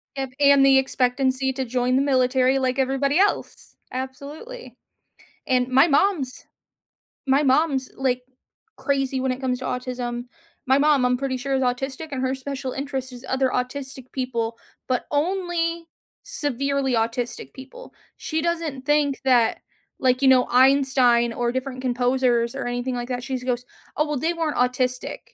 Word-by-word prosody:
If 270 -1 -3
and 280 -1 +6
the 270 0 +6
expectancy 265 0 +1
to 265 0 -3
join 250 +1 0
the 270 - +3
military 260 -1 +2
like 260 +1 0
everybody 275 +4 +1
else 405 - -1 0.2
absolutely. 285 - -7 0.7
And 250 -1 +2
my 265 +6 +5
mom's 290 -4 +1 0.8
my 270 +2 +4
mom's, 270 -1 +2
like, 255 -2 0 0.6
crazy 270 -2 -1
when 260 0 0
it 255 +1 -5
comes 250 -1 0
to 260 - -6
autism. 245 -1 -4 0.4
My 265 +1 +5
mom, 290 -2 +3
I'm 250 0 +2
pretty 265 -1 -2
sure 270 +2 -2
is 265 - +1
autistic 270 +5 -2
and 260 -2 -3
her 260 +1 0
special 265 -1 -5
interest 270 -2 -4
is 245 +1 -11
other 265 0 +1
autistic 260 +1 -4
people, 235 -3 -2 0.3
but 255 -1 -1
only 335 +1 -1 0.4
severely 280 - -1
autistic 230 +2 -2
people. 275 - -12 0.2
She 315 0 -2
doesn't 325 -6 -2
think 295 -2 +1
that 240 -4 +3 0.4
like, 255 0 +2
you 270 - +4
know, 255 -1 +6
Einstein 255 -2 +4
or 240 0 -1
different 260 0 -4
composers 245 -1 +1
or 270 - -3
anything 245 +1 -2
like 240 0 -4
that 250 -1 -3
she 265 -2 -3
goes, 250 -1 -2 0.3
"Oh, 300 - +2
well, 295 - -2
they 325 +6 0
weren't 325 -3 -2
autistic. 250 0 0
265 Hz, 155 wpm, -23 LUFS, 250-280 Hz, 0.8 s, and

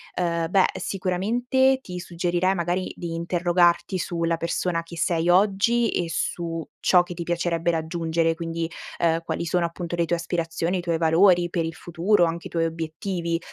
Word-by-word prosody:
ehm, 170 -2 -1
beh 190 0 +4
sicuramente 240 +8 +1
ti 180 -6 -7
suggerirei 175 +1 0
magari 175 +1 -1
di 170 -1 -5
interrogarti 175 +2 +2
su 170 -1 -3
la 165 0 +2
persona 170 +1 -1
che 165 0 -11
sei 165 +1 +1
oggi 210 +5 +3
e 175 - -1
su 165 -1 -3
ciò 180 -1 +5
che 175 - -8
ti 170 - -7
piacerebbe 170 0 0
raggiungere, 165 0 0
quindi, 165 -1 -3 0.3
ehm, 165 -1 +2
quali 170 - -3
sono 175 +1 +1
appunto 170 0 -4
le 170 0 +1
tue 175 - 0
aspirazioni, 170 +1 -2
i - - -3
tuoi 170 -1 -1
valori 175 +2 +4
per 170 -1 -1
il 165 0 -5
futuro, 175 +3 +2
anche 170 0 -3
i - - -14
tuoi 165 -1 0
obiettivi, 165 +1 -3
170 Hz, 175 wpm, -24 LUFS, 165-180 Hz, 0.3 s, ciò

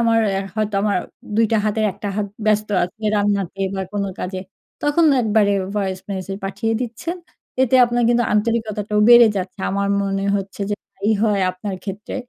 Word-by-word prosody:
আমার 230 -1 +3
অ্যা 195 0 -1
হয়তো 215 -1 -1
আমার 205 -3 +1 0.4
২ 225 - +4
টা 225 - +4
হাতের 215 +1 0
1 - - -12
টা - - 0
হাত 210 -1 0 0.2
ব্যস্ত 215 0 +2 0.2
আছে, 215 +5 -11
রান্নাতে 200 -2 0
বা 190 - -2
কোনো 200 -1 -1
কাজে 185 0 -4 0.4
তখন 295 +3 +3 0.2
একবারে 210 -2 +3 0.2
ভয়েস 190 -2 -1
মেসেজ 195 0 -4
পাঠিয়ে 225 +3 -2
দিচ্ছেন। 250 +9 -4 0.5
এতে 260 0 +2
আপনার 240 0 0
কিন্তু 240 0 +3
আন্তরিকতাটাও 210 -1 0
বেড়ে 240 -1 +9
যাচ্ছে 185 +1 -4
আমার 200 +1 0
মনে 195 0 -1
হচ্ছে, 195 +1 -6
যে, 205 - +1 0.2
তাই 200 +3 -1
হয় 210 -3 +2
আপনার 185 +2 -5
ক্ষেত্রে। 205 +1 -6
210 Hz, 175 wpm, -20 LUFS, 195-225 Hz, 0.5 s, বেড়ে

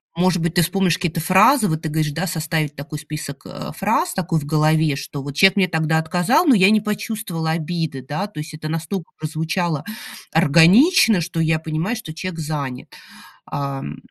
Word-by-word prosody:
может 180 +1 +2
быть, 170 -1 -1
ты 175 - +4
вспомнишь 175 +1 +1
какие-то 175 -2 -2
фразы, 205 - +5
вот 160 -3 -2
ты 160 - -3
говоришь 155 -1 -1 0.2
составить 155 -3 -2
такой 150 +1 -7
список, 150 -2 -7
э, - - -7
фраз 220 - 0
такой 180 -3 -1
в 145 - -7
голове, 155 0 +2
что 140 0 -6
вот 145 - -5
человек 195 +4 +5
мне 195 -2 +3
тогда 160 -2 0
отказал, 180 - +2
но 285 - +6
я 195 -3 +5
не 215 0 +4
почувствовала 205 -6 -3
обиды, 160 -4 -3
да, 155 +9 -3
то 205 - -10
есть 155 +1 -7
это 155 0 -7
настолько 165 +2 -4
прозвучало 160 0 -2 0.5
органично, 185 - +5
что 170 0 -4
я 160 0 +2
понимаю, 160 +8 -2
что 220 -9 -8
человек 170 +1 -6
занят, 145 -5 -5 0.5
ам. 140 - -5
160 Hz, 180 wpm, -20 LUFS, 155-185 Hz, 0.5 s, но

